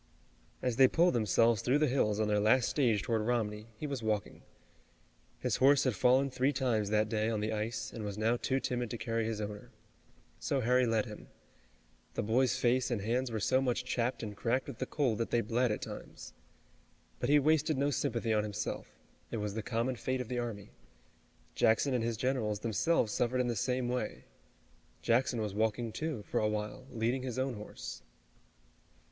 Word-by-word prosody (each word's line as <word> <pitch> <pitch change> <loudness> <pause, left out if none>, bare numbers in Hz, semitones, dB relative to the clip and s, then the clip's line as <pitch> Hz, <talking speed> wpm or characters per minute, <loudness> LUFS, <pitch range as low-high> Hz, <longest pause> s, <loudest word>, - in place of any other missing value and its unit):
As 125 -2 0
they 130 - +8
pulled 170 +6 +3
themselves 115 0 +3
through 130 +4 +2
the 155 - +3
hills 110 -6 +1
on 110 - +1
their 105 0 +2
last 120 +4 +4
stage 115 -8 +2
toward 115 -2 0
Romney, 110 -2 -1
he 150 - -5
was 140 -4 -3
walking. 105 -3 -2 1.0
His - - -1
horse 140 +1 +5
had 130 - +1
fallen 130 +6 +3
three 130 +2 +1
times 120 -7 0
that 105 0 +2
day 110 0 0
on 110 -2 -1
the 110 +1 -1
ice, 110 0 -3
and 115 - -6
was 100 -1 -4
now 110 +2 +2
too 130 +2 0
timid 125 -2 -2
to 120 - -4
carry 115 0 -1
his 110 -1 -2
owner. 105 -1 -6 0.7
So 140 -2 0
Harry 125 +1 +3
led 115 0 +1
him. 105 -3 -10 0.9
The - - -1
boy's 125 +4 +2
face 125 +1 +2
and 120 -4 -1
hands 120 +5 0
were 110 - -2
so 130 +6 +2
much 125 -1 0
chapped 125 -1 -1
and 105 -2 -5
cracked 120 +5 0
with 135 -5 -8
the - - -2
cold 130 -8 0
that 115 - -1
they 120 - +2
bled 120 +2 +1
at 105 - -3
times. - - -9 0.9
But - - -1
he 150 - +6
wasted 155 0 +2
no 140 +2 +1
sympathy 115 -3 0
on 105 - +3
himself. 105 0 -4 0.4
It - - -3
was 105 -1 -3
the 110 - -3
common 115 +5 -1
fate 130 +2 -2
of 125 - -5
the 125 -1 -1
army. 105 -4 -5 0.8
Jackson 115 +5 +3
and 120 -2 +1
his 115 -1 -1
generals, 115 -5 -1
themselves, 115 - +1
suffered 125 +1 0
in 125 - +2
the 120 - -1
same 125 +3 0
way. 125 +1 -3 0.8
Jackson 120 +1 +2
was 105 -2 -3
walking, 110 +2 0
too, 155 -5 -3
for - - -1
a 105 - +1
while, 105 +4 -4
leading 120 +3 0
his 125 -2 -4
own 130 0 0
horse. 105 -2 -8
115 Hz, 195 wpm, -32 LUFS, 110-130 Hz, 1.0 s, they